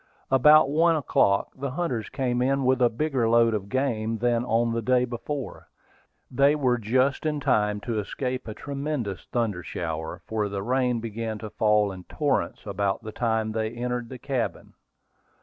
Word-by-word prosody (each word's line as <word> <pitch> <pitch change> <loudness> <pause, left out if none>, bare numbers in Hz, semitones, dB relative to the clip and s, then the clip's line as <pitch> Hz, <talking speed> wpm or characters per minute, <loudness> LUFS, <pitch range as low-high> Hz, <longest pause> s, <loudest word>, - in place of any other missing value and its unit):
About 150 +3 +7
one 165 +2 +4
o'clock, 100 -9 +2
the 140 +1 -4
hunters 130 - -2
came 125 -3 -1
in 135 +1 +1
with 130 0 +2
a 120 - +5
bigger 130 -2 0
load 115 0 +4
of 100 -2 -3
game 115 -4 -1
than 120 +1 +1
on 115 0 +1
the 115 - -1
day 125 +2 +2
before. 125 +3 -6 0.6
They 140 +3 +4
were 125 -4 +1
just 130 +6 +1
in 150 -2 -1
time 105 -6 +1
to 115 -1 -2
escape 125 +5 -4
a 110 - -6
tremendous 140 - -4
thunder 110 -7 -1
shower, 80 -2 -5
for 105 -2 -1
the 100 -1 -4
rain 125 0 +1
began 110 -1 -4
to 110 0 -8
fall 105 -1 +2
in 90 -1 -10
torrents 145 -3 -1
about 100 +1 -1
the 110 - -6
time 110 -1 0
they 110 0 -1
entered 120 0 -3
the 130 - -7
cabin. 130 -1 -3
120 Hz, 170 wpm, -26 LUFS, 110-135 Hz, 0.6 s, About